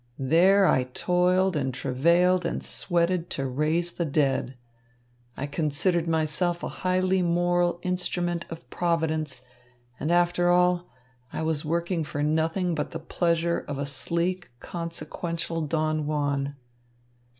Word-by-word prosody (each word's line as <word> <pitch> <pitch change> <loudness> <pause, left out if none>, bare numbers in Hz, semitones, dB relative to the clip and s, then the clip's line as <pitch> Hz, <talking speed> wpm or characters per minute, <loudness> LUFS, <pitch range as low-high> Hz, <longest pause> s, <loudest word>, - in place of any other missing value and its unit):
There 180 +9 +4
I 130 -7 +3
toiled 180 +6 +1
and 135 -3 0
travailed 170 +9 +2
and 170 - -2
sweated 175 0 0
to 135 - -1
raise 155 +6 0
the 170 - -2
dead. 135 -4 0 0.8
I 140 - -2
considered 160 +4 +1
myself 165 +2 0
a - - -2
highly 185 0 +1
moral 175 0 +2
instrument 175 -1 -1
of 165 0 -9
Providence, 160 -6 -1 0.5
and 155 - -1
after 175 0 +3
all, 180 0 +3 0.4
I - - -3
was 160 -2 -1
working 170 +2 -1
for 145 0 -3
nothing 160 +4 +1
but 150 -2 -2
the - - -5
pleasure 170 +1 0
of 145 - -4
a 140 - -2
sleek, 170 +6 -2
consequential 165 -1 -4
Don 155 -1 0
Juan." 145 -2 -1
170 Hz, 130 wpm, -26 LUFS, 150-175 Hz, 0.8 s, There